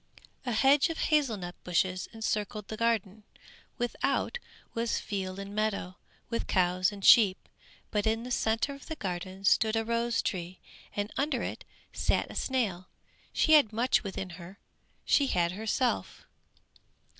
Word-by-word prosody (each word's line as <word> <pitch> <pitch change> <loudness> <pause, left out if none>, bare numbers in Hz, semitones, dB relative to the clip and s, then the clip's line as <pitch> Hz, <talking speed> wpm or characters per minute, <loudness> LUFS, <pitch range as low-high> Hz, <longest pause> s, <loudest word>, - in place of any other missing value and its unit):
A - - +1
hedge 275 +7 +4
of 330 - -4
hazel 290 -8 +2
nut 175 -2 -6
bushes 185 +1 0
encircled 215 -1 -3
the 220 - -4
garden; 220 -3 0 0.6
without 240 - -1 0.3
was 230 0 0
field 190 -2 -4
and 200 0 -7
meadow, 205 -4 -1 0.3
with 230 0 -3
cows 185 +1 +2
and 200 -1 -7
sheep; 205 -6 +6 0.4
but 210 -1 0
in 225 +1 0
the 250 - -7
centre 225 +4 +1
of 275 - -12
the 320 - -4
garden 185 - -5
stood 220 +3 +4
a 225 0 0
rose 235 0 0
tree, 180 -1 -4 0.4
and 205 +1 -2
under 290 +3 0
it - - -5 0.3
sat - - 0
a - - -10
snail 205 -9 -1 0.4
she 315 - +3
had 290 -8 +6
much 235 +4 +2
within 190 -2 -5
her, 180 +3 -11 0.5
she 280 - +4
had 170 -7 +1
herself. 220 +5 -1
215 Hz, 150 wpm, -30 LUFS, 190-235 Hz, 0.6 s, sheep